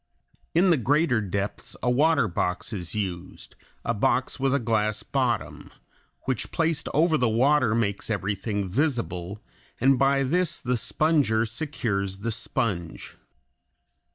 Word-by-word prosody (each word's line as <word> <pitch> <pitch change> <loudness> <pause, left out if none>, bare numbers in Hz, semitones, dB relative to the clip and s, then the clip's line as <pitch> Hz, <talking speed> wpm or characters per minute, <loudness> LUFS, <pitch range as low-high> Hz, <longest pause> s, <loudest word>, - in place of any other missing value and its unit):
In 180 +2 +5
the 165 - +4
greater 135 -1 +2
depths 100 0 -4
a 125 - +2
water 145 0 +3
box 90 +3 -2
is 90 -1 -5
used, 95 -4 -5 0.3
a - - +1
box - - 0
with 135 0 +1
a 140 - +3
glass 110 -4 0
bottom, - - -2 0.5
which 130 -3 -3
placed 165 -2 0
over 160 0 +3
the 125 - +2
water 125 0 +3
makes 100 -3 -1
everything 100 0 -2
visible, 105 - -2 0.4
and 130 +1 +4
by 135 0 +3
this 170 +4 0
the 125 -1 -1
sponger 135 -3 +2
secures 110 -7 -2
the 115 +4 -3
sponge. 105 -7 -3
115 Hz, 130 wpm, -26 LUFS, 100-140 Hz, 0.5 s, In